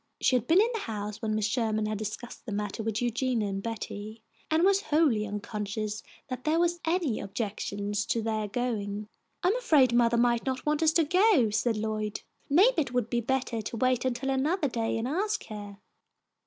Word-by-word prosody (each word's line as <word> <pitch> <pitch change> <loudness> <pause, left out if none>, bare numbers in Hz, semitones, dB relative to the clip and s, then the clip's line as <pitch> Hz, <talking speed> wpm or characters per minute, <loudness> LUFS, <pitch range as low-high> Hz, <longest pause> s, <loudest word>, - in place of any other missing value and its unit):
She 255 - +3
had 245 -1 0
been 340 +4 +5
in 445 +3 +4
the 450 - -2
house 210 - -5
when 215 -1 -1
Mrs. 215 -1 0
Sherman 215 -3 0
had 215 -1 -2
discussed 215 +4 -6
the - - -4
matter 210 +1 -3
with 220 +1 -2
Eugenia 240 -2 0
and 195 0 -3
Betty, 220 0 -6 0.3
and 315 +2 +3
was 395 +1 +4
wholly 290 - +2
unconscious 210 +1 -4 0.3
that 255 -1 -5
there 315 +2 +2
was 345 0 +1
any 325 -8 0
objection 200 0 -4
to 205 +3 0
their 215 -1 -1
going. 210 -2 -3 0.3
"I'm 370 +5 +3
afraid 295 - +4
mothah 235 0 +4
might 235 0 +3
not 260 -1 -3
want 300 0 +1
us 315 -1 +4
to 330 - +4
go," 360 - +4
said 220 +1 +1
Lloyd. 215 0 -2 0.3
"Maybe 360 - +5
it 255 -4 -4
would 240 -2 0
be 240 -1 +1
bettah 250 -2 -1
to 230 - -5
wait 255 +1 +2
until 260 +1 -1
anothah 285 +3 +1
day 225 -1 -1
and 225 +2 -2
ask 400 +10 -1
her." 205 -2 -7
235 Hz, 195 wpm, -28 LUFS, 215-285 Hz, 0.3 s, been